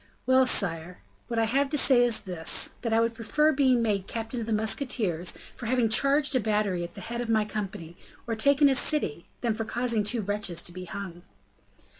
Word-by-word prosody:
"Well, 260 0 +4
sire! 175 -6 +1 0.2
what 235 - -5
I 225 - +2
have 275 +5 0
to 295 - +1
say 260 -3 +5
is 240 -2 +1
this, 175 -4 -1
that 230 - -3
I 225 - +2
would 230 0 0
prefer 300 +7 0
being 260 -4 +2
made 200 -4 -1
captain 225 +1 -5
of 225 - -6
the - - -4
musketeers 215 - +1 0.2
for 240 - -8
having 240 -2 +1
charged 275 +4 +3
a - - +3
battery 210 -5 -1
at 170 - -9
the 200 - -9
head 235 +5 -5
of 240 - -6
my 220 -2 +1
company, 200 -5 -7 0.3
or 230 - -3
taken 280 +6 +3
a 275 - +3
city, 250 - 0
than 235 -2 0
for 225 +1 -4
causing 235 -1 -1
two 225 +3 +1
wretches 200 -4 -1
to - - -1
be 180 +1 -9
hung." 180 -2 -8
225 Hz, 210 wpm, -26 LUFS, 200-250 Hz, 0.3 s, say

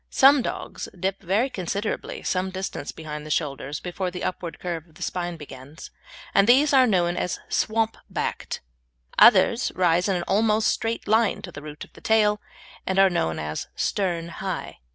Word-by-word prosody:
Some 275 +1 +6
dogs - - -5
dip 190 +2 -1
very 205 +7 +1
considerably 200 -2 -4
some 185 0 0
distance 190 -6 -5
behind 150 -2 -7
the 155 - -9
shoulders 145 -1 -2
before 180 +1 -3
the 180 0 -6
upward 175 -2 -4
curve 170 -2 -4
of 160 - -24
the - - -7
spine 175 -1 -3
begins, 145 0 -11 0.4
and 195 - +5
these 280 +5 +5
are 260 -2 +6
known 175 -4 +2
as 180 - -2
"swamp 225 0 +1
backed"; - - -3 0.6
others - - +6
rise 180 +1 +3
in 195 - +2
an 175 - -1
almost 215 +3 +2
straight 230 -1 -2
line 220 +1 +2
to 175 - -7
the 145 - -9
root 150 0 -8
of - - -15
the - - -15
tail, 210 -1 +3 0.5
and 190 - 0
are 195 -1 +6
known 80 - 0
as 75 0 -4
"stern 175 -4 -1
high." 170 - -5
185 Hz, 175 wpm, -25 LUFS, 165-210 Hz, 0.6 s, Some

